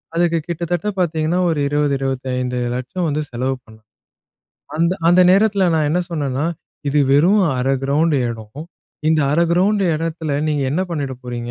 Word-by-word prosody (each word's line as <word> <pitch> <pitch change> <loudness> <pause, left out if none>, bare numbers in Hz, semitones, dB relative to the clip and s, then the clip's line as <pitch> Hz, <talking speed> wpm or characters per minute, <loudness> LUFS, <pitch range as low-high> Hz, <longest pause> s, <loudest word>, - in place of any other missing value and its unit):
அதுக்கு 170 -1 +2
கிட்டத்தட்ட 170 +3 -2
பார்த்தீங்கன்னா, 165 0 0
ஒரு 155 -3 0
20, 145 0 +1
25,00,000 125 +3 -2
வந்து 150 +1 -1
செலவு 130 +2 -1
பண்ணணும். 110 -1 -18 0.9
அந்த 170 +2 +2 0.2
அந்த 180 +1 +5
நேரத்தில 200 -1 +3
நான் 155 -2 +1
என்ன 175 +3 +1
சொன்னேன்னா, 145 -3 -2 0.4
"இது 145 +1 +2
வெறும் 185 +8 +4 0.2
1/2 135 +2 +1
கிரவுண்ட் 150 +2 +2
எடம். 115 +5 -7 0.5
இந்த 160 -1 +3
1/2 165 +3 +3
கிரவுண்டு 195 +3 +2
எடத்தில 160 -2 -3
நீங்க 145 -2 0
என்ன 180 +6 0
பண்ணிட 140 -5 -3
போறீங்க? 120 -1 -5
150 Hz, 145 wpm, -19 LUFS, 130-170 Hz, 0.9 s, அந்த